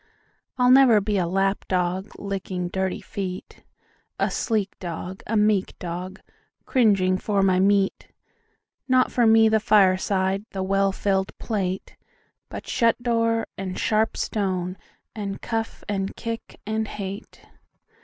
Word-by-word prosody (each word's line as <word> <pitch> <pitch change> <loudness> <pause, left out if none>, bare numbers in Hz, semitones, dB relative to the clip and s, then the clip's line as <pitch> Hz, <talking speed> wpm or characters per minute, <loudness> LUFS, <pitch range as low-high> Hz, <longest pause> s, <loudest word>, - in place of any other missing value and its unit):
I'll 250 0 +4
never 255 -5 +7
be 205 0 0
a 175 - 0
lap 195 +2 0
dog, 185 +2 -1
licking 190 -3 -4
dirty 190 +2 -2
feet,A 185 -2 -6
sleek 215 -4 -1
dog, 180 +1 -6
a 225 - 0
meek 210 -2 +2
dog, 180 +2 -6 0.4
cringing 195 -7 +3
for 200 -2 +1
my 185 -1 +3
meat, 195 0 +2 0.8
Not 255 -1 +3
for 240 -2 +3
me 225 0 +6
the 220 0 +3
fireside, 195 -1 +2
the 190 -1 -2
well 195 +1 +2
filled 190 0 -1
plate, 190 -4 -3 0.5
But - - -7
shut 230 0 +2
door, 230 -1 +1
and 185 -1 -4
sharp 220 +1 +1
stone, 185 -3 -2 0.4
and 200 -2 -5
cuff 225 -1 -4
and 195 -2 -2
kick, 230 0 -6
and 220 +1 -1
hate. 200 0 -7
195 Hz, 130 wpm, -24 LUFS, 190-220 Hz, 0.8 s, never